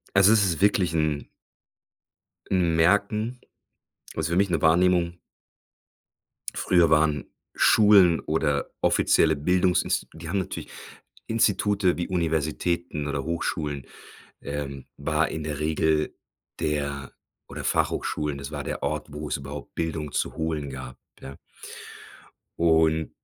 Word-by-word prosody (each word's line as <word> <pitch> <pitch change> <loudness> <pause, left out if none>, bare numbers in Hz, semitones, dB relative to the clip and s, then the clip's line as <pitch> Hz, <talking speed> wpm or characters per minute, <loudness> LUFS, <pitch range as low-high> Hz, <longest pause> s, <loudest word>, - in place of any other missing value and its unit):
Also, 95 +2 +7
es 110 -2 +4
ist 90 -3 0
wirklich 95 -4 +3
‘n 75 -2 0 1.2
‘n 90 -3 +2
Merken, 100 +8 +2 0.8
was 80 - -1
für 85 - -1
mich 100 0 +2
‘ne 85 - +1
Wahrnehmung 85 +1 +3 1.4
früher 85 -2 +3
waren 75 -3 +2 0.3
Schulen 100 -6 +6
oder 75 -2 -1
offizielle 80 -1 +3
Bildungsinsti 90 +5 +1
die 80 +1 -9
haben 100 +3 0
natürlich 95 - -5 0.6
Institute 105 -4 +2
wie 85 - -2
Universitäten 80 -2 -1
oder 70 -1 -2
Hochschulen, 75 -4 -3 0.6
äh, 70 -2 -5
war 75 +2 0
in 80 - -5
der 75 -1 -4
Regel 75 0 0 0.4
der 70 -2 -3 0.4
oder - - -7
Fachhochschulen, 75 -2 -1
das 70 - -7
war - - -4
der - - -5
Ort, 75 0 -2
wo 75 +1 -6
es 70 - -1
überhaupt 70 +1 -9
Bildung 80 -3 -3
zu - - -2
holen 80 -3 -2
gab. 65 -1 -8 0.2
Ja? 70 - -9 1.2
Un 80 -1 +3
80 Hz, 120 wpm, -25 LUFS, 75-90 Hz, 1.4 s, Also